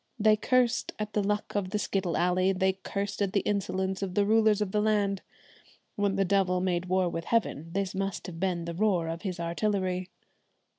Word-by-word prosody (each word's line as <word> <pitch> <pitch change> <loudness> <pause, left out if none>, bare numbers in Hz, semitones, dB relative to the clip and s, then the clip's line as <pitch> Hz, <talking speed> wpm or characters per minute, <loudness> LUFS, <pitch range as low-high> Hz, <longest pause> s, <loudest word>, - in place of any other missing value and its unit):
They 215 -1 +5
cursed 250 +2 +1
at 210 0 -4
the 210 - +2
luck 210 +1 -1
of 200 -2 0
the 210 - -1
skittle 190 -4 -1
alley; 185 +2 +2
they 190 0 +2
cursed 200 +2 -4
at 200 -1 0
the 200 - +3
insolence 190 -2 -1
of 185 -2 -3
the 205 - +3
rulers 220 -1 +4
of 210 -3 -1
the 210 - +1
land. 205 -2 +1 0.7
When 200 -1 +1
the 195 0 +2
devil 185 -1 +2
made 180 -1 0
war 185 0 +2
with 165 -1 -4
heaven, 165 -8 0
this 195 -1 -1
must 195 -1 -3
have 165 -2 -7
been 180 -2 -1
the 170 - -4
roar 180 -3 +1
of 165 +1 -4
his 185 -4 -4
artillery. 185 +1 -1
195 Hz, 200 wpm, -29 LUFS, 180-205 Hz, 0.7 s, They